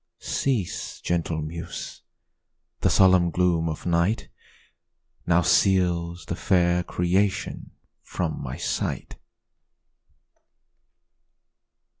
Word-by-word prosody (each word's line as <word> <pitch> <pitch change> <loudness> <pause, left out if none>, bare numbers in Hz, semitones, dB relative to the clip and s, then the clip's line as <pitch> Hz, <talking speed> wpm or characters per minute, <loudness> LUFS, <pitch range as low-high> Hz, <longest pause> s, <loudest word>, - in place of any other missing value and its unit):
Cease, 120 -10 -2
gentle 85 -2 -1
muse! 80 +2 -7 0.8
the - - +2
solemn 95 -2 +5
gloom 85 -2 +1
of 80 - -6
night 85 +6 +1 1.0
Now 85 0 +4
seals 90 -3 +2
the 85 - -3
fair 90 -1 +2
creation 95 +3 -1 0.3
from - - -3
my 65 -2 -5
sight. - - -3
85 Hz, 80 wpm, -25 LUFS, 85-95 Hz, 1.0 s, solemn